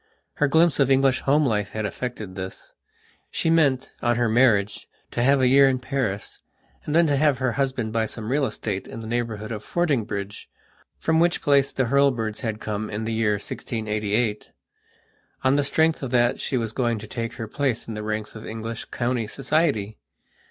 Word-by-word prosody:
Her 145 - +1
glimpse 160 +2 +3
of 135 -2 +4
English 135 -1 +4
home 145 +2 +3
life 105 -5 -1
had 110 -1 -2
effected 110 -3 -5
this. 95 0 -8 0.6
She 165 - 0
meant, 140 -5 +2
on 120 0 +2
her 120 0 +1
marriage, 110 -4 +2 0.2
to - - -1
have 135 +3 +4
a 130 - +4
year 135 +1 +6
in 130 - +1
Paris, 125 -6 -3 0.5
and 150 - -2
then 170 0 +6
to 145 -3 +2
have 145 -1 +3
her 130 -1 0
husband 130 -4 -1
buy 115 -1 +1
some 110 +1 -5
real 140 0 +2
estate 100 -3 -4
in 115 - -8
the - - -8
neighbourhood 115 -2 -3
of 110 -2 -5
Fordingbridge, 110 - -2 0.5
from 160 0 +1
which 170 +1 +2
place 140 -1 +3
the 130 - 0
Hurlbirds 120 -4 +1
had 110 -3 -3
come 110 0 -3
in 105 +1 -4
the 115 +1 -2
year 110 -2 +2
1688. 105 +1 -2 0.9
On 130 +1 +4
the 145 - +2
strength 160 +3 +2
of 135 - -3
that 120 -1 +2
she 130 - -1
was 115 -2 -2
going 120 -1 0
to 105 - -8
take 115 +1 -4
her 115 -2 -6
place 125 0 -1
in 115 - -5
the 105 - -5
ranks 105 0 -3
of 110 - -8
English 115 0 -5
county 120 -2 -2
society. 125 -5 0
120 Hz, 190 wpm, -24 LUFS, 110-135 Hz, 0.9 s, year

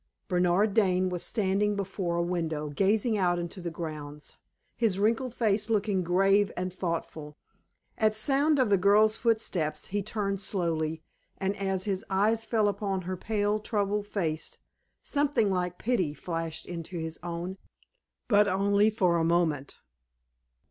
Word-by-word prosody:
Bernard 180 +3 +2
Dane 185 -3 +3
was 180 -1 -3
standing 205 -1 0
before 190 -3 -2
a 170 - +1
window, 160 -4 -2
gazing 205 - +1
out 175 -2 +2
into 175 +2 -5
the 175 - -3
grounds, 150 -3 -7 0.4
his 220 -5 +1
wrinkled 230 +4 0
face 215 -1 +1
looking 205 -3 +1
grave 195 +3 +3
and 180 0 -3
thoughtful. 165 -4 -4 0.6
At 215 -1 +3
sound 280 +7 +2
of 255 -6 +2
the 200 - +5
girl's 210 +3 +5
footsteps 215 -10 0
he 205 +1 -1
turned 200 -1 -2
slowly, 160 -5 -2 0.3
and 195 +1 -1
as 195 -2 -1
his 195 -2 -2
eyes 215 +4 +2
fell 220 -2 +1
upon 195 -2 -2
her 185 +1 -3
pale, 210 +2 0
troubled 205 -1 -1
face, 160 -7 -2 0.5
something 280 -8 +1
like 180 -1 -2
pity 185 -11 0
flashed 165 -1 -4
into 175 0 -6
his 160 -1 -5
own 175 +2 -5 0.7
but 210 -2 +5
only 200 +2 +3
for 185 -6 +2
a 165 - +1
moment. 165 -4 0
195 Hz, 145 wpm, -28 LUFS, 170-210 Hz, 0.7 s, the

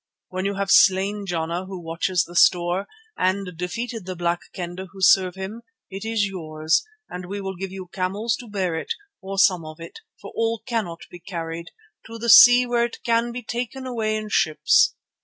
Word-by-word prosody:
When 185 +1 -3
you 200 0 -1
have 195 0 -1
slain 195 +2 +4
Jana 170 +1 -2
who 190 -1 -7
watches 170 +1 0
the 175 - -12
store, 175 +2 +3 0.3
and 185 -1 0
defeated 190 +5 -5
the 185 - -4
Black 175 0 0
Kendah 180 0 -6
who 195 - -12
serve 185 0 +4
him, 195 +4 -6 0.3
it 195 +2 -6
is 225 -2 0
yours 160 -4 -1 0.2
and 180 0 -7
we 200 +2 -4
will 190 -1 -5
give 190 +1 -6
you 190 -1 -7
camels 200 +5 -1
to 245 - -10
bear 190 -4 -1
it, 160 - -3 0.3
or 195 0 -6
some 185 -4 +4
of 155 +1 -10
it, 165 - -10 0.2
for - - -10
all 225 -1 -1
cannot 210 -9 -3
be 175 - -10
carried, 170 -1 -6 0.4
to 230 0 -8
the 235 +1 -3
sea 245 +2 +9
where 240 -1 +1
it 235 - -8
can 235 0 +1
be 245 +1 -6
taken 245 +3 -4
away 220 -4 -1
in 215 0 -6
ships. 155 -6 +3
190 Hz, 195 wpm, -23 LUFS, 175-220 Hz, 0.4 s, sea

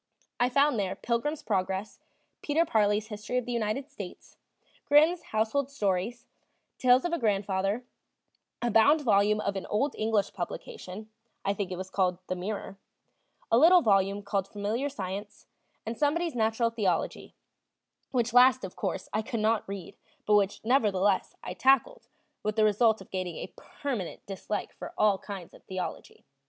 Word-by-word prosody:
I 245 +1 +3
found 280 -2 +3
there 190 -2 -1
Pilgrim's 265 +6 -2
Progress, 190 0 -2 0.4
Peter 315 +3 +2
Parley's 210 -4 +1
History 215 +3 -4
of 250 - -1
the 245 - -4
United 235 +3 -1
States, 190 -4 -9 0.5
Grimm's 315 +4 +5
Household 225 +6 0
Stories, 215 -1 -1 0.5
Tales 255 +2 +5
of 350 - -1
a 340 - 0
Grandfather, 200 0 0 0.8
a 240 - +1
bound 285 +9 +5
volume 210 -4 +3
of 200 -1 -2
an 195 - -4
old 265 +7 0
English 215 -2 0
publication 190 +3 -7 0.3
(I 200 - +2
think 200 -2 -4
it 180 - -4
was 185 +1 -6
called 180 -2 +1
The 185 - 0
Mirror), 195 +1 -5 0.7
a 230 - +6
little 345 +3 +7
volume 200 -1 +2
called 200 -1 -1
Familiar 215 +8 -2
Science, 200 -4 -6 0.4
and 225 +2 -3
somebody's 315 +5 0
Natural 230 0 +1
Theology, 195 -7 -1 0.7
which 240 -2 0
last, 255 0 +6
of 190 - -6
course, 185 - -3
I 215 - +1
could 225 +1 -4
not 215 -1 +1
read, 195 -4 -7 0.3
but 210 - +2
which, 205 -1 +2
nevertheless, 205 -5 +2
I - - -5
tackled, 270 - +2 0.3
with 215 0 -2
the 220 - +3
result 215 0 +3
of 190 - -14
gaining 185 -3 -3
a - - -7
permanent 270 - -5
dislike 200 +1 -4
for - - -9
all 205 -2 +3
kinds 195 -4 -8
of - - -16
theology. 185 -1 -6
215 Hz, 160 wpm, -29 LUFS, 195-245 Hz, 0.8 s, little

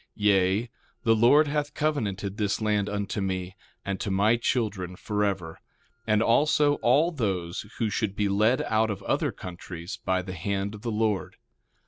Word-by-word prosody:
Yea, 100 +1 +2 0.4
the 115 -2 +4
Lord 135 +7 +5
hath 145 0 -2
covenanted 105 -10 -1
this 105 -2 0
land 105 -2 0
unto 100 0 -2
me, 95 -1 -3 0.3
and 100 -1 -2
to - - -3
my 100 +4 +3
children 105 -6 -1
forever, 100 -5 -2 0.5
and 110 0 +3
also 145 +4 +3
all 145 +8 +3
those 95 - -2
who 115 - 0
should 105 -1 -1
be 105 0 +1
led 105 +5 +2
out 110 0 +1
of 100 - -4
other - - 0
countries 90 +1 -8
by 95 0 0
the 95 0 -6
hand 100 +3 -2
of 105 - -9
the 120 - -3
Lord. 105 -3 -1
105 Hz, 160 wpm, -27 LUFS, 95-115 Hz, 0.5 s, Lord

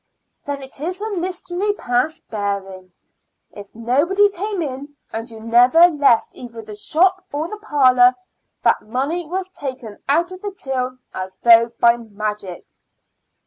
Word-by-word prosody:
"Then 285 -1 -4
it 265 0 -10
is 360 +5 -4
a 435 +1 -4
mystery 365 +2 -2
past 255 -2 -1
bearing. 195 -3 -4 0.6
If 205 0 -12
nobody 295 - +2
came 400 -1 -3
in, 285 +1 -7 0.2
and 225 +2 -5
you 225 -1 -10
never 245 +9 +6
left 285 -8 +2
either 230 -2 -9
the 215 0 -10
shop 365 - +1
or 300 +3 -2
the 425 +4 -8
parlor, 255 -8 +4 0.5
that - - +3
money 280 +9 -3
was 370 +3 -3
taken 260 - -7
out 340 +5 +2
of 370 0 -9
the 410 -1 -5
till 255 -1 -3 0.2
as 185 0 -6
though 230 -1 +7
by 235 0 +5
magic." 210 -4 -6
265 Hz, 145 wpm, -20 LUFS, 230-350 Hz, 0.6 s, though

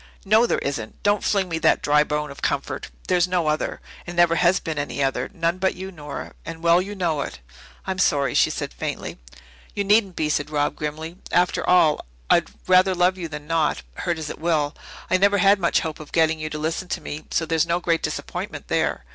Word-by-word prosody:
"No, 220 +4 +5
there - - +1
isn't. 120 -6 -4
Don't 205 0 +2
fling 195 -3 +1
me 165 -2 -2
that - - +3
dry 150 0 +4
bone 150 -1 -2
of 140 - -11
comfort. - - -2 0.2
There's 175 -1 +3
no 180 -2 0
other, 155 0 -1 0.3
and 175 - -6
never 175 -1 +5
has 180 +2 +4
been 160 -2 -4
any 145 0 -2
other 135 -1 -1
none 170 -2 -1
but 190 0 +1
you, 190 +1 -7
Nora, 150 -5 -7
and 165 0 -8
well 170 +1 +5
you 205 +2 -6
know 165 -6 0
it." - - -6 0.5
"I'm 190 -1 -3
sorry," 140 -5 +2
she - - +4
said - - -4
faintly. - - -5 0.6
"You 200 - 0
needn't 200 -2 +3
be," 155 - 0
said 150 -1 -1
Rob 145 -1 0
grimly. 160 +3 -5
"After 180 +1 +2
all, 160 -4 +4 0.3
I'd - - +4 0.2
rather 185 0 +5
love 180 +1 +3
you 170 - -3
than 150 -2 -8
not, 160 -1 0
hurt 170 - -2
as 155 -2 -5
it - - -9
will. 155 -3 +1 0.4
I 185 - +5
never 200 +2 +4
had 195 +1 +5
much 170 -2 +2
hope 160 -1 -5
of 155 - -11
getting 160 -1 +2
you 155 0 -4
to 155 - -5
listen 160 +4 -2
to - - -3
me, 150 +1 -7
so 165 - 0
there's 160 0 +1
no 170 +1 +1
great 170 -2 +1
disappointment - - -5
there. - - 0
165 Hz, 220 wpm, -23 LUFS, 150-185 Hz, 0.6 s, No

